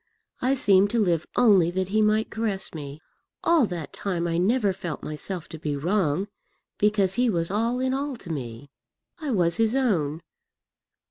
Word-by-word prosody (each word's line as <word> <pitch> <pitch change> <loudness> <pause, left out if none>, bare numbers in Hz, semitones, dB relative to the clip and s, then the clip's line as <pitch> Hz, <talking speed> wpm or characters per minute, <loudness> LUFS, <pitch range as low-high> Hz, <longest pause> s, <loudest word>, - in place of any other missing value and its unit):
I 260 +2 +2
seemed 200 -5 +4
to 235 - 0
live 175 -6 +1
only 195 -8 +5
that 185 +1 -2
he 215 +2 +2
might 215 +1 +2
caress 210 -3 -2
me. 145 -1 -8 0.4
All 330 -8 +4
that 170 -5 -6
time 175 -4 -2
I 165 0 0
never 205 +1 +2
felt 175 -5 -6
myself 155 +2 -5
to 160 - -8
be 150 -2 -2
wrong, 175 +2 0 0.5
because 205 -2 +2
he 245 +2 +2
was 170 -3 -1
all 230 +4 0
in 260 0 0
all 275 0 -2
to 185 -7 -9
me. 130 -1 -6 0.5
I 305 -3 -4
was 175 -7 +1
his 225 +1 +2
own. 170 - 0
195 Hz, 175 wpm, -25 LUFS, 165-225 Hz, 0.5 s, only